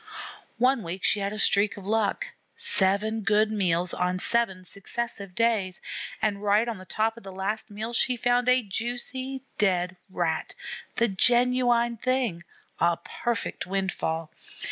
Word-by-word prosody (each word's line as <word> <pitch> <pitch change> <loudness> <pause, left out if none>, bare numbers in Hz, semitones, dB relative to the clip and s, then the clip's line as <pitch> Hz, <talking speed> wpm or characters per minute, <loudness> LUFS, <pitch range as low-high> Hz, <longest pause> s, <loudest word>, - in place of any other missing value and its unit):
One 255 +1 +3
week 180 0 -5
she 210 - +3
had 200 0 -1
a 215 - -5
streak 205 0 +3
of 195 - -9
luck. 220 - 0 0.3
Seven 210 +3 +1
good 210 +1 +3
meals 180 -4 +1
on 180 0 0
seven 190 -3 0
successive 200 -1 -3
days; 215 -6 +1 0.4
and 205 -2 +1
right 210 +3 +3
on 225 -5 -3
the 185 - -11
top 225 +4 0
of - - -10
the 195 - -8
last 205 +4 -3
meal 215 +3 -5
she 250 +1 +2
found 245 +1 +2
a 255 0 +4
juicy 245 +5 -3 0.2
dead 185 -2 +2
Rat, 165 -3 -1 0.4
the 235 - +3
genuine 240 +2 +3
thing, 250 -8 0 0.4
a 170 0 +3
perfect 235 -7 -3
windfall. 180 -4 -2
210 Hz, 145 wpm, -27 LUFS, 190-235 Hz, 0.4 s, a